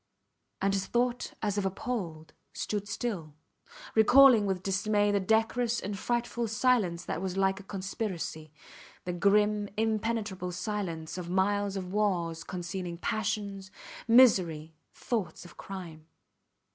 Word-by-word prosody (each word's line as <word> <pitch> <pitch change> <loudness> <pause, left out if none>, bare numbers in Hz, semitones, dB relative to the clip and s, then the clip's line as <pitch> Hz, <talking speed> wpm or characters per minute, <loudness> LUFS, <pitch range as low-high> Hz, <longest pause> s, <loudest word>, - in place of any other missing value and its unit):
And 195 0 +2
his 195 -1 -1
thought, 245 0 0
as 205 -1 0
if 195 - -2
appalled, 180 -6 -4 0.2
stood 205 -1 -3
still, 185 - -4 0.6
recalling 225 -1 +7
with 190 -1 -2
dismay 205 +2 +1
the 200 - +2
decorous 225 +4 +1
and 200 +1 -4
frightful 240 +2 -1
silence 215 -6 +1
that 165 - -3
was 190 0 -3
like 195 0 +2
a - - -11
conspiracy; 190 -5 -4 0.5
the 180 - -2
grim, 205 +3 +2
impenetrable 215 -4 -1
silence 180 -5 -4
of 175 -1 -6
miles 200 +2 +1
of 185 -1 -5
walls 175 -6 0
concealing 180 -1 -5
passions, 200 -1 -2 0.4
misery, 185 -10 +5 0.2
thoughts 195 -8 -3
of 175 - -13
crime. 170 -5 -9
195 Hz, 125 wpm, -29 LUFS, 180-220 Hz, 0.6 s, recalling